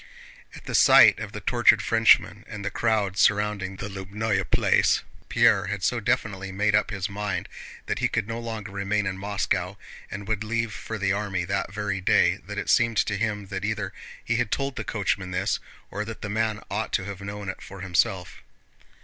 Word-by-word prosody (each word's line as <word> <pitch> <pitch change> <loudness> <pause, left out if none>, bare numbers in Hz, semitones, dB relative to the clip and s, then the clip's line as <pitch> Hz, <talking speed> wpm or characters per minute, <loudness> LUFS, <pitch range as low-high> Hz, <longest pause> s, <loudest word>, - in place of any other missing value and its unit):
At - - -12
the - - -5
sight - - +7
of - - -6
the - - -7
tortured - - +4
Frenchman - - +4
and 100 -2 -7
the 100 - -2
crowd 105 -4 0
surrounding 105 -2 +2
the 95 - -6
Lóbnoe 100 0 -2
Place, - - +3 0.3
Pierre 95 -1 +4
had 100 0 -4
so 125 - +1
definitely 95 -3 -1
made 105 +2 +1
up 105 0 +3
his 100 -2 -3
mind 100 -2 -3 0.4
that - - -2
he - - +2
could - - -2
no 115 +1 -4
longer 110 -3 -6
remain 100 +1 -1
in 95 -1 -2
Moscow 100 0 -1 0.3
and 100 0 -7
would 110 -1 -1
leave 115 0 -2
for 110 - -6
the 95 -1 +1
army 100 -3 -2
that 95 +1 -2
very 100 -2 -3
day - - +3
that - - -6
it - - -3
seemed 115 -2 +3
to 105 - +1
him 105 -1 -2
that 95 -1 -4
either 105 -2 -2 0.3
he 120 - +1
had 120 -3 0
told 135 +2 -2
the 110 - -4
coachman 100 -2 -2
this 90 +2 -1 0.3
or 100 +2 -3
that 110 +1 -8
the 105 - -4
man 110 0 -1
ought 105 +2 -2
to 95 - 0
have 100 -1 -7
known 100 0 -6
it 95 - -5
for 95 -1 -10
himself. 90 0 0
100 Hz, 200 wpm, -25 LUFS, 95-110 Hz, 0.4 s, sight